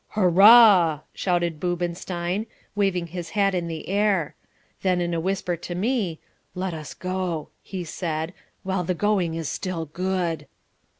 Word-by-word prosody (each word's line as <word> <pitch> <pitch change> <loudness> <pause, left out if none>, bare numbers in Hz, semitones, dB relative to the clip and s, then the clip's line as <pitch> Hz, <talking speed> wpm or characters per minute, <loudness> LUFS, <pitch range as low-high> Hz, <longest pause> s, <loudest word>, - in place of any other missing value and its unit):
"Hurrah!" 190 -4 +7
shouted 175 -4 0
Boobenstein, 175 +3 -2 0.3
waving 195 -4 +1
his 170 0 -6
hat 200 -1 +3
in 175 -2 -1
the 160 -1 -6
air. 195 -5 +1 0.5
Then 185 -2 +2
in 175 -1 -1
a 165 - 0
whisper 185 0 -1
to 175 +1 -6
me: 200 -4 -1 0.4
"Let 185 -1 -2
us 155 -4 -7
go," 185 -4 -3
he 185 -2 -6
said, 160 0 -3 0.3
"while 190 -1 -1
the 180 +1 -1
going 185 -4 +1
is 165 -2 -3
still 175 -3 -3
good." 175 -1 -2
180 Hz, 140 wpm, -24 LUFS, 170-190 Hz, 0.5 s, Hurrah